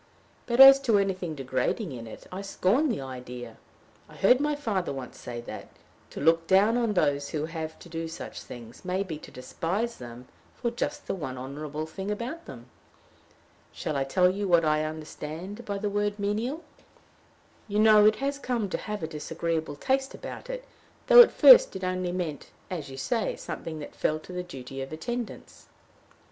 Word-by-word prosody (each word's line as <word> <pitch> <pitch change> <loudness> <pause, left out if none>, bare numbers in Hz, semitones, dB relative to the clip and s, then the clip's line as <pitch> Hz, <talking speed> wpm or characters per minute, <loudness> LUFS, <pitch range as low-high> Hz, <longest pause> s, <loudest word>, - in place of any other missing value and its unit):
But 235 +1 -1
as 270 0 +11
to 235 -6 +3
anything 185 -5 -1
degrading 135 - -2
in 115 -3 -7
it, 110 - -11
I 185 +2 -5
scorn 200 +9 +1
the 225 - -2
idea. 125 -2 -8 0.5
I - - -14
heard 250 +6 +5
my 295 +1 +1
father 210 -11 -2
once 135 -3 -7
say 120 -1 -6
that, - - -9 0.4
to - - -8
look 165 +2 +3
down 200 +4 +5
on 235 -3 +1
those 145 -4 +1
who 155 -1 -2
have 160 -1 -6
to - - -13
do 165 -1 -4
such 165 - -8
things 120 -1 -11
may 185 +1 -1
be 160 -6 -6
to - - -12
despise 180 - -3
them 120 0 -10 0.3
for 235 - -2
just 285 +4 -3
the - - -2
one 140 -9 -5
honorable 150 +4 -5
thing 190 +5 -6
about 240 +11 -4
them. 120 -2 -10 1.1
Shall 155 - -4
I 135 - +1
tell 180 +7 +3
you 195 +2 -1
what 170 -2 +4
I 155 0 +2
understand 160 +7 -7
by 200 -1 -3
the 205 +1 -2
word 205 0 -1
menial? 220 +10 -2 1.0
You 205 -1 -2
know 215 -1 +7
it 215 - +4
has 280 +4 -2
come 240 -7 -2
to - - -1
have 210 -4 -5
a - - -1
disagreeable 160 0 -3
taste 265 - -1
about - - -8
it, - - -5 0.4
though - - +10
at 475 - +7
first - - +8
it 190 - -5
only 185 -1 -1
meant, 170 -6 -4 0.2
as 155 -6 -4
you 135 - -9
say, 225 - -1
something 160 -1 -6
that 150 - -8
fell 155 - 0
to 180 - -11
the 180 - -2
duty 135 -6 -8
of 135 - -6
attendants." 235 +9 -6
180 Hz, 185 wpm, -27 LUFS, 150-215 Hz, 1.1 s, as